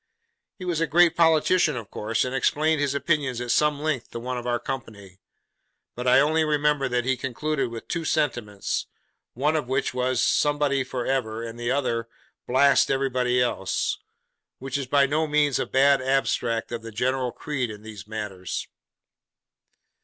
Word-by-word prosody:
He 185 - -8
was 170 -3 -1
a 165 - +2
great 170 +2 +4
politician 165 -2 +3
of 110 -4 -8
course, 110 +3 -1
and 125 - -4
explained 155 +3 +1
his 140 -1 0
opinions 140 -5 0
at 120 -1 -2
some 150 +2 +2
length 150 -5 -2
to 115 - -6
one 125 +2 -4
of 120 0 -5
our 120 0 +1
company; 100 -8 -7 0.7
but 125 +1 -5
I 125 +1 +6
only 155 +3 +3
remember 150 -2 +1
that 125 -1 0
he 130 0 +2
concluded 135 +2 -2
with 115 -1 -8
two 170 -1 -2
sentiments, 120 -11 -1 0.5
one 150 +6 +1
of 150 -5 -1
which 130 0 -1
was, 125 -1 0
Somebody 145 0 +2
for 125 -1 -4
ever; 115 -4 -1
and 115 0 -7
the 120 0 -2
other, 120 -4 0 0.4
Blast 140 +2 +4
everybody 130 -2 +1
else! 120 -6 -1 0.6
which 135 +1 -6
is 140 -2 -2
by 140 +1 +4
no 155 +3 0
means 150 -2 +2
a - - -1
bad 135 0 +4
abstract 125 -4 0
of 120 -1 -4
the 115 0 -8
general 125 +3 -1
creed 135 -5 -3
in 105 0 -9
these 105 -2 -10
matters. 105 -5 -5
130 Hz, 170 wpm, -25 LUFS, 120-145 Hz, 0.7 s, I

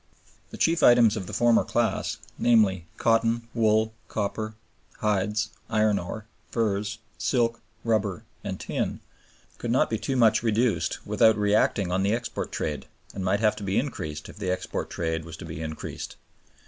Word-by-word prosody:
The - - -9
chief 165 0 +2
items 120 -4 +6
of 95 -4 -4
the - - -6
former 120 -1 +4
class, 115 -4 0 0.2
namely, 100 -7 +3
cotton, 115 0 +2
wool, 110 -1 +2
copper, 110 +1 -3 0.4
hides, 105 +1 0 0.2
iron 110 -2 +3
ore, 105 +5 -6 0.2
furs, 105 -2 -1 0.2
silk, 115 -3 +1 0.2
rubber, 105 -5 0 0.2
and - - -4
tin, - - -2 0.6
could 120 - -3
not 120 0 +2
be 110 +4 -1
much 115 -3 +5
reduced 110 -6 0
without 110 -2 +4
reacting 105 -2 +2
on 90 +1 +1
the 100 +2 +2
export 120 0 -4
trade, 75 -3 -3 0.3
and 95 - -4
might 100 +3 +1
have 105 -1 +3
to 105 - -6
be 95 0 0
increased 75 - -3
if - - -12
the 100 -3 -3
export 90 - -2
trade 80 -1 -2
was 80 0 -9
to 90 - -8
be 80 -1 -6
increased. 80 -1 -6
105 Hz, 160 wpm, -26 LUFS, 95-115 Hz, 0.6 s, items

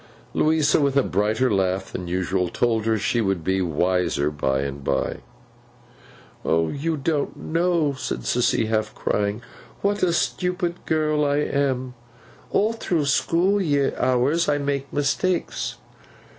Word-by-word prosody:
Louisa, 155 -1 +3
with 140 -1 +2
a 140 - +5
brighter 105 +5 +1
laugh 95 0 0
than 90 - -5
usual, 90 0 0
told 115 +2 0
her 110 -1 +2
she 115 +3 0
would 95 -5 0
be 95 +2 +1
wiser 90 -3 +1
by 65 -2 0
and 70 0 -5
by. - - -1 1.3
'You 140 - 0
don't 145 0 -1
know,' 165 -3 +1
said 130 -2 -4
Sissy, 120 -2 +1
half 110 -1 -1
crying, 105 +2 -1 0.4
'what 205 +1 +1
a 180 - +3
stupid 180 +1 -1
girl 155 -1 +1
I 145 0 +2
am. 135 -3 0 0.6
All 215 +3 +2
through 170 -9 -1
school 175 +8 +2 0.3
hours 130 +6 +2
I 145 - +2
make 140 -1 -2
mistakes. 165 +5 -1
130 Hz, 130 wpm, -23 LUFS, 95-155 Hz, 1.3 s, a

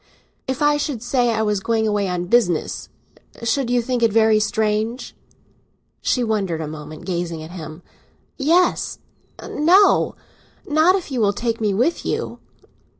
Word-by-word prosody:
"If 265 +3 -2
I 295 0 +4
should 285 -6 -3
say 245 0 +1
I 220 -1 0
was 210 -2 0
going 220 +2 0
away 205 -2 0
on 180 -1 -2
business, 180 -6 +1 0.5
should 235 +2 0
you 245 -1 +2
think 250 0 -1
it 230 -2 +3
very 220 0 +4
strange?" 215 +3 -1 0.9
She 250 - +1
wondered 200 -7 -1
a 160 - -4
moment, 155 +2 -9
gazing 170 -3 -3
at 160 - -10
him. 160 -1 -9 0.5
"Yes—no. 345 +2 +1 0.5
Not 315 +5 +4
if 365 -6 -4
you 250 -3 -1
will 205 -1 +3
take 230 +1 -2
me 210 -2 +1
with 255 - +1
you." - - -3
225 Hz, 150 wpm, -21 LUFS, 190-260 Hz, 0.9 s, I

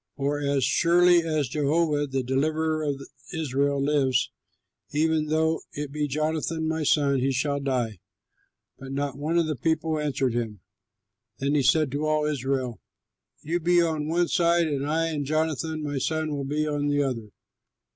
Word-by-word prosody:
For 145 +1 -1
as 140 -2 0
surely 175 +3 +4
as 155 -4 -1
Jehovah 150 +2 +1
the 135 -1 -2
deliverer 155 +5 0
of 140 -2 -2 0.3
Israel 140 -2 0
lives, 140 -2 +1 0.6
even 155 0 +1
though 160 +1 +1
it 145 -1 -5
be 150 0 -1
Jonathan 155 +2 -1
my 160 0 -1
son, 140 -2 +2
he 135 +2 +1
shall 140 +2 0
die." 125 -7 -1 0.8
But 135 0 -7
not 140 -1 -2
one 160 +4 0
of 170 - +3
the 155 -1 -2
people 160 +3 0
answered 135 -4 0
him. 110 -5 -3 0.8
Then 140 +1 0
he 150 - +3
said 150 +1 +3
to 145 +2 -1
all 155 0 +1
Israel, 130 -5 -2 0.6
"You 170 +3 -1
be 175 +1 +3
on 155 -2 -1
one 170 +2 +1
side, 170 -1 +3
and 140 -2 -2
I 165 +2 +1
and 150 -3 -2
Jonathan 155 +1 -1
my 145 -2 -2
son 155 +2 -1
will 140 -1 -3
be 150 +2 -1
on 145 -1 -1
the 145 0 +2
other." 115 -6 -3
150 Hz, 165 wpm, -26 LUFS, 140-160 Hz, 0.8 s, surely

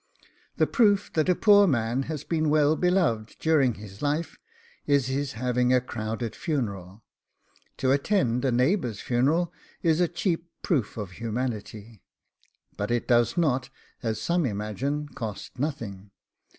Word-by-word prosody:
The - - +4
proof 205 -5 +2
that 155 +2 +1
a 180 - +4
poor 205 0 +6
man 120 -3 +1
has 155 -3 -4
been 155 -2 0
well 150 0 +4
beloved 165 - +1
during 145 -7 +3
his 100 -1 -11
life 150 +3 -1 0.5
is 140 -3 +3
his 135 +1 -2
having 125 +1 +1
a 130 - +5
crowded 115 -1 -4
funeral. 100 - -3 0.7
To 130 - +1
attend 140 - +1
a 135 - +2
neighbour's 125 - +1
funeral 145 +8 +1 0.3
is 165 0 +3
a 175 - +4
cheap 170 0 -2
proof 130 - 0
of 100 -4 -5
humanity, 110 -1 -5 0.7
but 105 - -3
it 120 0 0
does 120 +2 +3
not, 135 -6 +1 0.3
as 110 -3 -2
some 170 -4 +1
imagine, 120 +8 -3
cost 110 0 -7
nothing. 110 -9 -4
130 Hz, 140 wpm, -26 LUFS, 115-160 Hz, 0.7 s, poor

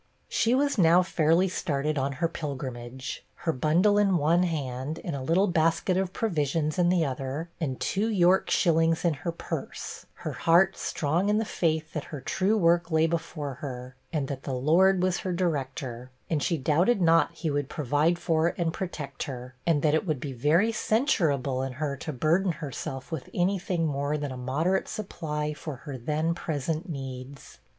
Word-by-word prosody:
She 235 +2 +2
was 280 -3 +1
now 175 +1 +6
fairly 170 +1 +3
started 150 -4 -1
on 140 0 -1
her 165 +5 0
pilgrimage; 130 -4 -6
her 165 -2 -1
bundle 175 +10 +3
in 195 -3 +3
one 165 +3 +3
hand, 145 -3 -2
and 170 - -3
a 135 - -4
little 165 +9 +3
basket 170 0 +2
of 190 -1 0
provisions 155 -6 -1
in 175 -1 +4
the 175 -3 +3
other, 135 +5 -4
and 135 -6 -2
two 210 +3 0
York 185 -3 +3
shillings 165 -1 +3
in 170 - +3
her 170 +4 -4
purse 165 - -6 0.2
her - - -1
heart 175 +3 +4
strong 165 +7 0
in 210 - +3
the 220 - 0
faith 160 -5 -1
that 150 - -3
her 150 - -7
true 190 +10 +1
work 170 -2 +3
lay 160 -1 +3
before 160 -3 -3
her, 125 -2 -6 0.2
and 150 -4 -1
that 135 -1 -5
the 135 - -3
Lord 180 +8 +4
was 185 -1 +1
her 185 - -3
director; 135 -7 -2 0.2
and 155 -3 +1
she 170 - +1
doubted 165 - +2
not 165 -2 +4
he 160 -2 -3
would 145 -1 -1
provide 150 +4 +1
for 165 -1 +1
and 165 -2 0
protect 150 -8 -5
her, 125 -1 -7
and 155 -4 +3
that 150 -1 +3
it 160 +4 +1
would 155 -4 0
be 135 0 -5
very 155 - +3
censurable 160 - +1
in 135 -1 -3
her 140 +1 -2
to 155 - -5
burden 165 +7 +2
herself 135 -2 -6
with 160 -5 -5
any 185 +2 +2
thing 175 -2 -1
more 145 0 -1
than 145 -2 -4
a - - -5
moderate 145 +10 0
supply 150 -7 -3
for 150 -1 -6
her 140 +2 -8
then 150 +6 -1
present 160 +2 -3
needs. 135 -2 -7
160 Hz, 185 wpm, -27 LUFS, 140-175 Hz, 0.2 s, now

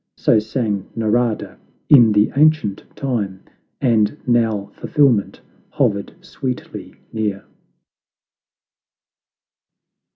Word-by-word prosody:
So 110 - +3
sang 105 -3 -3
Narada 115 0 -1 0.3
in 120 -6 +7
the 105 0 +3
ancient 150 -9 +2
time, 105 -8 -3 0.4
And 115 -1 +1
now 115 -4 +1
fulfilment 135 -9 +1 0.3
hovered 100 -1 -1
sweetly 130 -7 -6 0.2
near. 105 -3 -3
110 Hz, 75 wpm, -19 LUFS, 105-125 Hz, 0.4 s, in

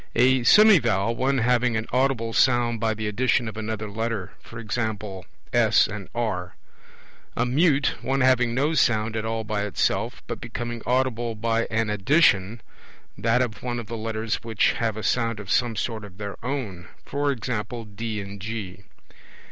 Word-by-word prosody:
A 130 +2 +4
semivowel, 120 - +5
one 135 +2 +1
having 125 -1 +2
an 110 - -2
audible 125 -3 +1
sound 120 -2 +3
by 110 -1 0
the 110 0 -3
addition 120 +2 +1
of 110 - -6
another 110 -1 -4
Letter; 110 -2 -3 0.2
e.g. 115 0 -5 0.7
S - - +5
and 100 -2 -7
R. 100 -7 -2 0.8
A 125 - +2
mute, 145 +2 +2
one 135 +1 0
having 125 -2 +3
no 145 +5 +1
sound 110 -6 +2
at 110 0 -2
all 110 0 -2
by 105 -1 -2
itself, 105 - -1
but - - -6
becoming 120 0 -5
audible 120 -2 0
by 115 +1 0
an 110 -1 0
addition, 105 - +3 0.5
that 120 +2 +2
of 110 -5 -5
one 120 -1 -3
of 120 - -6
the 115 - -6
Letters 110 0 -3
which 115 -2 +2
have 115 -2 -2
a 110 - -5
sound 115 -3 0
of 100 -2 -6
some 120 -2 +2
sort 110 -1 -3
of 100 -2 -12
their 100 -1 -5
own; 115 -10 -4 0.3
e.g. 125 -5 -2
D 110 -1 -3
and 100 0 -9
G. 100 -3 -6
115 Hz, 165 wpm, -24 LUFS, 110-125 Hz, 0.8 s, semivowel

